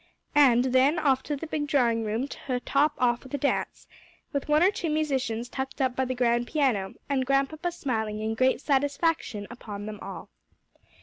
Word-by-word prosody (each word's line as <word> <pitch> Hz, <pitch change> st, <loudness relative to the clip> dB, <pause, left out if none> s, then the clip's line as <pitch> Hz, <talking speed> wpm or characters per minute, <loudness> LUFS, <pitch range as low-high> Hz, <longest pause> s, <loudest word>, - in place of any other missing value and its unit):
And 260 Hz, -5 st, +5 dB
then 270 Hz, +5 st, +4 dB
off 275 Hz, -4 st, +2 dB
to 295 Hz, -, -3 dB
the 285 Hz, -, -6 dB
big 305 Hz, -2 st, -3 dB
drawing 235 Hz, -6 st, +2 dB
room 220 Hz, +5 st, -1 dB
to 255 Hz, -2 st, -4 dB
top 285 Hz, +4 st, +2 dB
off 240 Hz, -1 st, +2 dB
with 265 Hz, +1 st, -6 dB
a -, -, 0 dB
dance, 280 Hz, +1 st, -1 dB, 0.5 s
with 280 Hz, +1 st, -2 dB
one 300 Hz, +2 st, +4 dB
or 380 Hz, -, +5 dB
two 345 Hz, -5 st, -3 dB
musicians 270 Hz, -7 st, -1 dB
tucked 265 Hz, +3 st, -5 dB
up 260 Hz, -2 st, +1 dB
by 260 Hz, -, 0 dB
the 255 Hz, 0 st, -3 dB
grand 240 Hz, -1 st, +1 dB
piano, 240 Hz, -11 st, 0 dB
and 275 Hz, -2 st, +1 dB
Grandpapa 275 Hz, +6 st, 0 dB
smiling 220 Hz, -10 st, -2 dB
in 220 Hz, +1 st, -1 dB
great 260 Hz, +4 st, +2 dB
satisfaction 285 Hz, -5 st, 0 dB
upon 205 Hz, -4 st, -7 dB
them 210 Hz, -1 st, -7 dB
all. -, -, -8 dB
265 Hz, 185 wpm, -27 LUFS, 240-290 Hz, 0.5 s, And